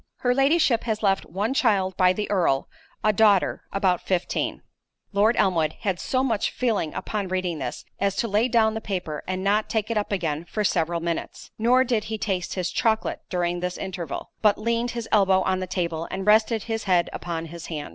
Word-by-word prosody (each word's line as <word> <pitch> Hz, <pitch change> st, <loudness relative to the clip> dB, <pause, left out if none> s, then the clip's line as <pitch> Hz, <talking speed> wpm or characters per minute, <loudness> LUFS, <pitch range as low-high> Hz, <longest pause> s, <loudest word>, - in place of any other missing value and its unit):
Her 245 Hz, -1 st, +3 dB
Ladyship 275 Hz, -3 st, +3 dB
has 220 Hz, -1 st, -2 dB
left 195 Hz, -1 st, +2 dB
one 205 Hz, +9 st, -1 dB
child 195 Hz, -8 st, +2 dB
by 185 Hz, 0 st, +4 dB
the 210 Hz, +3 st, -2 dB
Earl, 170 Hz, -9 st, +2 dB, 0.4 s
a 215 Hz, -, +3 dB
daughter, 205 Hz, -2 st, +3 dB
about 190 Hz, -3 st, +1 dB
fifteen." 185 Hz, -2 st, -2 dB, 0.5 s
Lord 210 Hz, +4 st, +3 dB
Elmwood 165 Hz, -6 st, +2 dB
had 195 Hz, -5 st, -1 dB
so 255 Hz, 0 st, 0 dB
much 225 Hz, -6 st, 0 dB
feeling 220 Hz, -11 st, -1 dB
upon 205 Hz, -3 st, -3 dB
reading 185 Hz, -3 st, -2 dB
this, 125 Hz, -3 st, -5 dB
as 195 Hz, -1 st, +1 dB
to 235 Hz, -, 0 dB
lay 215 Hz, +3 st, +2 dB
down 225 Hz, -3 st, +3 dB
the 220 Hz, -, -4 dB
paper, 180 Hz, -8 st, -4 dB
and 185 Hz, 0 st, -2 dB
not 210 Hz, +2 st, +1 dB
take 220 Hz, 0 st, -1 dB
it 220 Hz, -, +2 dB
up 205 Hz, -, -4 dB
again 165 Hz, -5 st, -1 dB
for 210 Hz, +4 st, -2 dB
several 170 Hz, -3 st, 0 dB
minutes—nor 225 Hz, +8 st, 0 dB
did 235 Hz, -4 st, 0 dB
he 220 Hz, 0 st, -3 dB
taste 190 Hz, -4 st, -2 dB
his 180 Hz, -2 st, -2 dB
chocolate 220 Hz, -2 st, 0 dB
during 175 Hz, -1 st, -1 dB
this 180 Hz, 0 st, -3 dB
interval, 180 Hz, -6 st, -5 dB
but 210 Hz, -2 st, +4 dB
leaned 235 Hz, +2 st, 0 dB
his 230 Hz, -1 st, -4 dB
elbow 190 Hz, -3 st, +4 dB
on 190 Hz, -1 st, 0 dB
the 185 Hz, -, -4 dB
table 170 Hz, -3 st, -2 dB
and 190 Hz, 0 st, -4 dB
rested 215 Hz, +1 st, +4 dB
his 225 Hz, -1 st, -3 dB
head 180 Hz, -3 st, +3 dB
upon 165 Hz, -1 st, -4 dB
his 170 Hz, +1 st, -9 dB
hand. 150 Hz, -3 st, -5 dB
195 Hz, 195 wpm, -25 LUFS, 180-220 Hz, 0.5 s, by